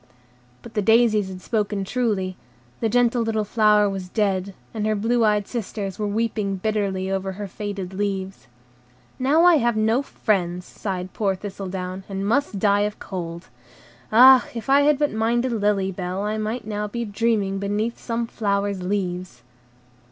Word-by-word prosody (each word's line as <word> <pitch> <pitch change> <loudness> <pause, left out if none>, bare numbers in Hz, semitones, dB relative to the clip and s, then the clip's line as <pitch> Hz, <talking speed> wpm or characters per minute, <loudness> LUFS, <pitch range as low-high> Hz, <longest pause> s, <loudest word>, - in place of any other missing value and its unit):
But 235 - -11
the 210 - 0
daisies 220 -1 +4
had 185 -1 -8
spoken 210 -3 -1
truly; 195 -4 -1 0.4
the 225 - 0
gentle 245 +1 +2
little 220 -1 0
flower 210 0 +4
was 190 -2 -4
dead, 195 -2 -1 0.2
and 215 -1 -2
her 215 - +1
blue 230 +3 +1
eyed 210 -2 +2
sisters 205 -4 -4
were 210 - -1
weeping 210 -2 -1
bitterly 195 -2 -1
over 190 0 -2
her 205 +1 -6
faded 195 -1 -5
leaves. 195 -4 -3 0.7
"Now 285 +6 +3
I 350 -2 +7
have 240 -4 +1
no 220 +4 +2
friends," 180 -9 -1
sighed 185 -3 -5
poor 195 -3 0
Thistledown, 190 -1 -6
"and 195 0 -3
must 235 0 +1
die 200 0 +3
of 205 0 -1
cold. 170 -2 -6 0.6
Ah, 255 +3 +8
if 230 +3 -3
I 280 +1 +6
had 295 0 +4
but 295 0 +1
minded 235 +3 +1
Lily 205 -3 +1
Bell, 185 +1 -4
I 215 +1 -2
might 220 +2 -3
now 210 -1 -3
be 235 +3 -4
dreaming 205 -2 0
beneath 210 +4 -2
some 230 0 -2
flower's 200 -3 -1
leaves." 180 -7 -3
205 Hz, 160 wpm, -23 LUFS, 195-225 Hz, 0.7 s, Ah